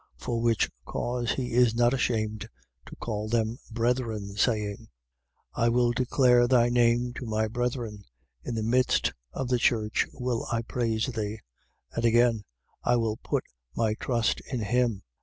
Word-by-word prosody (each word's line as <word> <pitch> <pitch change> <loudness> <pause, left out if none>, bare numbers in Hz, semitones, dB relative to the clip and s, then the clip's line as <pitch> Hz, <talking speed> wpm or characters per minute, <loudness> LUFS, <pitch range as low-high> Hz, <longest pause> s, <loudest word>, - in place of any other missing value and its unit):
For 115 -1 -2
which 115 -1 +2
cause 120 - -2
he 125 -2 -3
is 120 -2 +4
not 120 +1 +3
ashamed 110 -4 -1 0.4
to - - -10
call 110 -1 -4
them 115 +1 0
brethren, 115 -3 -1
saying: 105 -2 0 0.7
2:12. - - 0
I - - +4
will 120 0 +3
declare 125 0 +3
thy 120 -1 +4
name 120 0 +2
to 130 - -5
my 110 0 0
brethren: 120 -3 -3 0.4
in 115 - -4
the 110 - -1
midst 125 +3 +2 0.2
of 130 - -4
the 125 -1 +2
church 110 -3 +1
will 125 -2 -3
I 115 -1 0
praise 115 -2 -1
thee. 110 -3 -3 0.5
2:13. - - -13
And 115 - +1
again: 115 -1 +4 0.4
I 120 - +3
will 115 -2 0
put - - -2 0.3
my 110 -2 +1
trust 115 0 0
in 125 -4 -1
him. 115 -2 0
115 Hz, 160 wpm, -27 LUFS, 110-125 Hz, 0.7 s, is